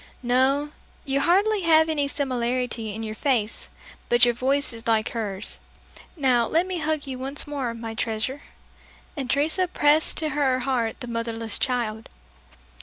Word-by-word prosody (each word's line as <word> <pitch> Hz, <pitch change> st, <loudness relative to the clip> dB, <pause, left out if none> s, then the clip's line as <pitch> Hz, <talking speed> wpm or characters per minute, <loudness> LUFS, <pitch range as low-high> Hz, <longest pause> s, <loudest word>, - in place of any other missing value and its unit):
"No, 265 Hz, +4 st, +2 dB, 0.3 s
you 275 Hz, -1 st, +1 dB
hardly 395 Hz, +7 st, +3 dB
have 320 Hz, -2 st, +5 dB
any 295 Hz, -3 st, +1 dB
similiarity 250 Hz, -4 st, -2 dB
in 225 Hz, -, -5 dB
your 215 Hz, -1 st, -4 dB
face, 230 Hz, -3 st, -1 dB, 0.4 s
but 240 Hz, 0 st, +6 dB
your 240 Hz, -, +2 dB
voice 270 Hz, +3 st, 0 dB
is 230 Hz, 0 st, -9 dB
like 220 Hz, -1 st, +2 dB
hers. 210 Hz, -4 st, -4 dB, 0.6 s
Now, 250 Hz, -5 st, +3 dB
let 335 Hz, +3 st, +2 dB
me 370 Hz, -2 st, -3 dB
hug 310 Hz, -1 st, -1 dB
you 260 Hz, -2 st, -6 dB
once 270 Hz, +2 st, -3 dB
more, 270 Hz, -5 st, -3 dB
my 225 Hz, -1 st, -6 dB
treasure." 225 Hz, +5 st, -2 dB, 0.7 s
And 270 Hz, -5 st, -4 dB
Teresa 315 Hz, +6 st, +2 dB
pressed 305 Hz, -2 st, +3 dB
to 310 Hz, -, +1 dB
her 270 Hz, -3 st, +1 dB
heart 245 Hz, -2 st, -1 dB
the 245 Hz, -, -5 dB
motherless 230 Hz, -1 st, -3 dB
child. 230 Hz, -4 st, -1 dB
260 Hz, 155 wpm, -25 LUFS, 230-290 Hz, 0.7 s, but